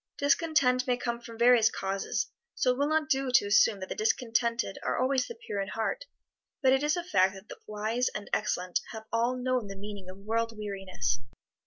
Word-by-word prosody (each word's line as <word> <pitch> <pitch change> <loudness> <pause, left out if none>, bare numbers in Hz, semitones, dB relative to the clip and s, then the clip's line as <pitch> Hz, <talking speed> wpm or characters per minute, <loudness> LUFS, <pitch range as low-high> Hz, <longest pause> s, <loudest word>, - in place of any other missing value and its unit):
Discontent 280 -4 +2
may 250 -1 +2
come 235 -1 -3
from 230 -1 -10
various 235 -1 +6
causes, 195 0 -2 0.2
so 255 - +2
it 250 - -2
will 285 - +2
not 310 0 +1
do 270 -3 +1
to 250 - +6
assume 205 0 +4
that 185 - -6
the - - -2
discontented 235 - 0
are - - -1
always 260 0 +1
the 470 - -7
pure 210 - -4
in 195 - -3
heart, 225 - -2 0.6
but 260 0 +6
it 265 - +3
is 300 +3 +1
a 350 - -2
fact 190 - +2
that 190 +2 -13
the - - -9
wise 215 +4 -1
and 205 - -5
excellent 180 -4 0
have 220 -1 -7
all 235 +2 +2
known 250 -3 0
the 195 - -7
meaning 200 -1 -8
of 185 - -9
world 225 +2 -2
weariness. 190 - -2
230 Hz, 205 wpm, -29 LUFS, 205-260 Hz, 0.6 s, various